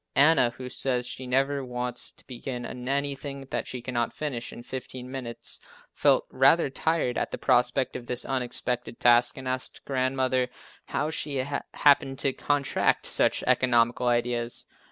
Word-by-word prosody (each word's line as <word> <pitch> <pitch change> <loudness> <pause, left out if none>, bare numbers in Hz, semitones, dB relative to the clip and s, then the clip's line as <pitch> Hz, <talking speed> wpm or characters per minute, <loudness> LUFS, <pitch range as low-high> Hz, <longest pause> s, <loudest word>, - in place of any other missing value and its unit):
Anna, 145 -4 +6
who 125 +2 -9
says 125 -1 0
she 130 +1 -5
never 135 +2 +1
wants 125 -1 -2
to - - -15
begin 125 -1 -6
anything 140 +2 -3
that - - -2
she 125 -2 -6
cannot 120 -2 -1
finish 130 -6 -4
in 120 - -10
15 130 0 -7
minutes, 125 -3 -5 0.3
felt - - +3
rather 135 +3 +4
tired 155 -4 0
at - - -2
the - - -5
prospect 125 0 +2
of 120 - -6
this 125 0 +1
unexpected 125 -2 -2
task 120 0 +5
and 130 -1 -7
asked 130 0 -3
Grandmother 130 -1 0 0.4
how 155 - -1
she 150 -2 -2 0.4
happened 140 -2 +4
to 135 -1 0
contract 145 0 +1
such - - +3
economical 120 0 +3
ideas. 120 0 0
130 Hz, 150 wpm, -27 LUFS, 125-135 Hz, 0.4 s, Anna